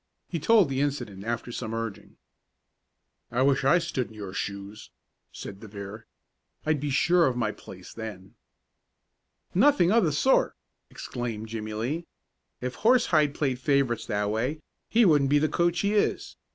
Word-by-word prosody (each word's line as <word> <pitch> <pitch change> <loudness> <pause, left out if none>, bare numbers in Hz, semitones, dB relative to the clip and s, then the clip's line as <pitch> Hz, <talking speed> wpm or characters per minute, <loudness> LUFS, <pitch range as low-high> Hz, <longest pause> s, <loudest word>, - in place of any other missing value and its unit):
He 170 - -3
told 215 +3 +5
the 135 0 -1
incident 120 -9 -3
after 120 +1 -3
some 115 -1 -4
urging. 115 -3 -6 1.1
"I 125 +2 +1
wish 135 0 +3
I 135 +6 +5
stood 165 -8 -2
in 110 - -15
your 100 -3 -7
shoes," 100 +2 -5 0.4
said 95 - -8
De 110 - -10
Vere. 100 +2 -9 0.6
"I'd 155 -1 +1
be 145 +1 -2
sure 170 +5 +4
of 125 -2 -1
my 110 -3 0
place 90 -3 -12
then." 105 -4 -8 1.2
"Nothing 195 -4 +4
of 230 0 +4
the 160 - +2
sort!" 205 - +2 0.3
exclaimed 115 -3 -5
Jimmie 110 -1 -5
Lee. 140 +10 -3 0.5
"If 125 0 -3
Horsehide 180 - +4
played 130 -4 -1
favorites 135 -3 +1
that 105 -1 0
way, 130 +8 -2 0.3
he 230 0 +4
wouldn't 145 -6 +4
be 145 - +4
the 155 +2 +3
coach 170 +2 +1
he 200 +1 +1
is. 210 - 0
130 Hz, 160 wpm, -27 LUFS, 110-160 Hz, 1.2 s, told